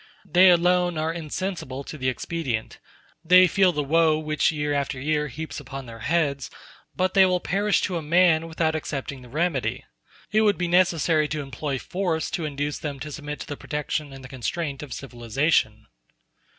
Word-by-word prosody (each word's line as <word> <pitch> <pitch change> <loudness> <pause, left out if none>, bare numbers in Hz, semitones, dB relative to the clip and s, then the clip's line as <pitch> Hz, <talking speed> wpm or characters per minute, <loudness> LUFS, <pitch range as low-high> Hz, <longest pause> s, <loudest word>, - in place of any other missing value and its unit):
They 185 +3 +6
alone 175 0 +3
are 160 +1 -1
insensible 165 -4 -4
to 155 - -8
the 130 -3 -1
expedient; 130 -4 -3 0.4
they 180 +2 +7
feel 185 +1 +3
the 150 -3 -1
woe 160 +2 +3
which 155 0 +1
year 150 -2 -1
after 140 -1 -2
year 150 +2 0
heaps 155 +4 -6
upon 135 -1 -8
their 115 -1 -10
heads, 140 0 0 0.5
but 185 0 0
they 195 - +7
will 180 -1 +3
perish 200 +5 +1
to 180 -3 -1
a - - -3
man 165 0 +3
without 160 -1 0
accepting 140 -3 -4
the 125 - -13
remedy. 155 -1 -1 0.5
It 215 - +4
would 210 -2 +3
be 180 - -1
necessary 170 -3 +3
to 150 0 -3
employ 135 +1 -4
force 175 +2 -2
to 175 -5 -2
induce 145 0 -3
them 145 -3 -5
to 150 +3 -6
submit 150 0 -6
to - - -5
the 145 - -4
protection 150 0 -3
and 135 -1 -11
the - - -8
constraint 140 +3 -4
of 145 -3 -9
civilization. 120 -2 0
155 Hz, 180 wpm, -25 LUFS, 140-170 Hz, 0.5 s, they